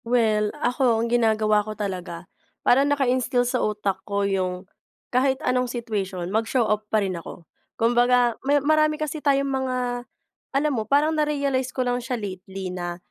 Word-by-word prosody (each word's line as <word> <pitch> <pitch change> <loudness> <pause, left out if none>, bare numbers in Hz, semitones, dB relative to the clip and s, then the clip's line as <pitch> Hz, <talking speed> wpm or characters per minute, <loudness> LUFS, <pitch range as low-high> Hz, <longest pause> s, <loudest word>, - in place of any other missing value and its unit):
Well, 220 -3 +2
ako 250 -4 +2
ang 230 +1 -1
ginagawa 215 -2 +3
ko 215 +1 -7
talaga, 180 -4 -5 0.4
parang 275 +3 +4
naka-instill 255 -3 +1
sa 250 +1 0
utak 210 -2 -1
ko 200 -1 -1
yung, 185 -1 -1 0.5
kahit 265 +1 +3
anong 250 0 +1
situation 205 -7 -3
mag-show 225 +2 +1
up 215 0 -1
pa 215 -2 +2
rin 190 - -2
ako. 170 - -11 0.3
Kumbaga, 240 +1 +3
may 285 +2 +2
marami 305 +1 +2
kasi 305 0 -4
tayong 275 -1 +2
mga 265 -2 -1 0.8
alam 295 +1 +1
mo, 220 -4 -3
parang 295 +3 +3
na-realize 280 -4 0
ko 255 0 -2
lang 245 0 0
siya 250 0 -3
lately 190 -2 -6
na, 175 -1 -4
240 Hz, 160 wpm, -24 LUFS, 210-265 Hz, 0.8 s, parang